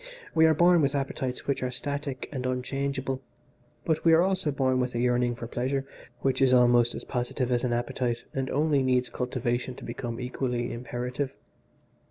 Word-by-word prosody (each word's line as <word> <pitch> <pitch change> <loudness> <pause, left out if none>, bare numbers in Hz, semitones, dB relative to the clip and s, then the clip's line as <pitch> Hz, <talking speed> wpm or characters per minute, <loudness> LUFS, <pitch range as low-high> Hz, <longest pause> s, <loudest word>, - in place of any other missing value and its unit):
We 160 0 +6
are 160 - +4
born 175 +1 +5
with 140 0 +1
appetites 135 -2 -2
which 140 - -1
are 130 - -1
static 140 +1 -4
and 130 -3 -3
unchangeable, 135 +1 -2 0.6
but 160 -2 0
we 165 - +6
are 165 +2 +6
also 190 -4 +1
born 130 -2 +1
with 125 -1 -1
a - - 0
yearning 120 0 +2
for 120 - -6
pleasure 130 +4 -2 0.4
which 135 0 +1
is 130 -1 +6
almost 120 -1 +5
as - - -5
positive 125 0 -2
as 120 0 +1
an 125 - 0
appetite 120 0 -1
and 135 -1 -2
only 150 -1 +2
needs 125 -1 +2
cultivation 125 0 -2
to - - -11
become 120 -1 -5
equally 125 -1 -2
imperative. 125 +3 -4
130 Hz, 180 wpm, -28 LUFS, 125-140 Hz, 0.6 s, We